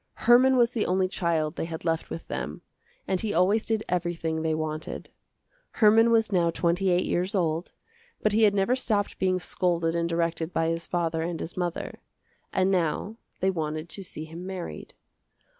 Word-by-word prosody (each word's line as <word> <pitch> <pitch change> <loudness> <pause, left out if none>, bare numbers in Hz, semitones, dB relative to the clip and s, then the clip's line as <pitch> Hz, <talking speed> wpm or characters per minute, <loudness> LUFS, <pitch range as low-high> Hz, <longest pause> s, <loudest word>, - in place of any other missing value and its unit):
Herman 255 +2 +6
was 240 -1 +4
the 230 -3 -1
only 185 +1 +2
child 165 -4 -1
they - - -1
had 165 0 -7
left 165 -1 -1
with 165 - -7
them, - - -5 0.4
and 185 - 0
he 215 -2 -2
always 195 +5 +3
did 220 -1 0
everything 170 -2 -1
they 160 -1 0
wanted. 155 0 -5 0.6
Herman 225 +1 +5
was 225 -2 +3
now 175 -3 +3
twenty 175 +3 +1
eight 180 0 +2
years 185 +4 0
old, 165 -2 0 0.5
but 215 - +3
he 215 +2 +2
had 205 -2 +5
never 195 +6 +2
stopped 215 -6 -1
being 185 -1 +2
scolded 170 -2 0
and 170 0 0
directed 165 0 -1
by 165 0 +1
his 165 0 -2
father 165 -2 -1
and 165 0 -3
his 165 - -6
mother. 175 -2 -3 0.5
And 190 +1 +2
now 185 +4 0 0.2
they 190 +1 +3
wanted 155 -1 -3
to 195 +4 -6
see 155 -3 -6
him 165 +2 -9
married. 185 -2 -7
175 Hz, 180 wpm, -27 LUFS, 165-200 Hz, 0.6 s, Herman